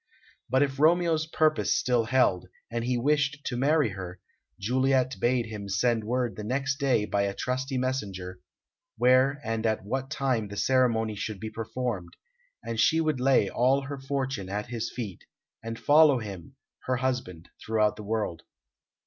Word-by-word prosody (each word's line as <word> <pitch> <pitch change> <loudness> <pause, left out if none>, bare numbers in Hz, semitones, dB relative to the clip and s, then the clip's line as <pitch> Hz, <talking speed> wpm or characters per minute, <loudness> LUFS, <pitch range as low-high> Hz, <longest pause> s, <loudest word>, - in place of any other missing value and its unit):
But 130 +3 +4
if 135 -1 -3
Romeo's 160 0 +3
purpose 155 -11 +2
still 120 -3 +1
held, 110 -8 +2 0.2
and 115 0 -2
he 125 +1 0
wished 145 +2 +1
to 125 - -2
marry 145 +1 +2
her, 90 -2 -7 0.4
Juliet 130 +3 +1
bade 120 -1 +1
him 105 -3 -7
send 115 +4 +1
word 125 +1 -1
the 105 - -6
next 135 +5 -1
day 130 -7 +2
by 100 0 0
a 100 0 -3
trusty 130 +1 -2
messenger, 100 -8 -3 0.6
where 130 +4 +4
and 115 0 -2
at 110 -3 -1
what 130 +5 -3
time 130 -6 -1
the 100 0 -8
ceremony 115 -1 +2
should 105 0 -5
be 110 +1 -6
performed; 115 -5 -4 0.5
and 115 -1 -4
she 160 - +4
would 155 -4 0
lay 130 -5 +3
all 130 +6 +2
her 140 0 -6
fortune 135 -7 -3
at 105 +4 -4
his 120 -1 -3
feet, 110 -7 -6 0.4
and 115 0 -5
follow 150 0 +5
him, 100 -7 -8 0.3
her 130 - +1
husband, 125 -10 -3
throughout 105 -1 +1
the 105 - -9
world. 105 -5 -2
125 Hz, 165 wpm, -27 LUFS, 105-135 Hz, 0.6 s, follow